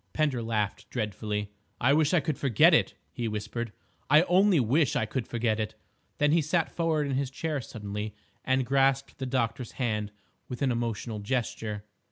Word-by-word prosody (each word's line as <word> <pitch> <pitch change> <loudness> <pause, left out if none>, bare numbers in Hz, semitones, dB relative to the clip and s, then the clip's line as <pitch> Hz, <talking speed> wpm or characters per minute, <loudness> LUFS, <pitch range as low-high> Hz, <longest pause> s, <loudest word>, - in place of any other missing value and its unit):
Pender 145 -6 +1
laughed 110 -3 -2
dreadfully. 105 -2 -3 0.3
"I 130 +3 +4
wish 155 0 +3
I 175 -3 +4
could 150 0 -2
forget 130 -7 +5
it," - - +3 0.2
he 115 +7 -3
whispered, 105 +2 -4 0.4
"I 150 +4 +7
only 185 -1 +4
wish 135 +4 +2
I 110 - +1
could 120 +3 -3
forget 115 -2 0
it!" 110 -1 -3 0.4
Then 150 0 +3
he 165 +1 +4
sat 160 +2 0
forward 160 -3 0
in 140 - -2
his 135 -1 0
chair 150 +1 -3
suddenly, 105 -2 -6 0.3
and 130 0 +1
grasped 135 +1 +1
the 130 - -3
doctor's 125 -1 -1
hand 105 -5 -1 0.4
with 125 +2 -4
an 135 - +2
emotional 115 -2 -2
gesture. 105 -2 -3
125 Hz, 175 wpm, -28 LUFS, 110-140 Hz, 0.4 s, I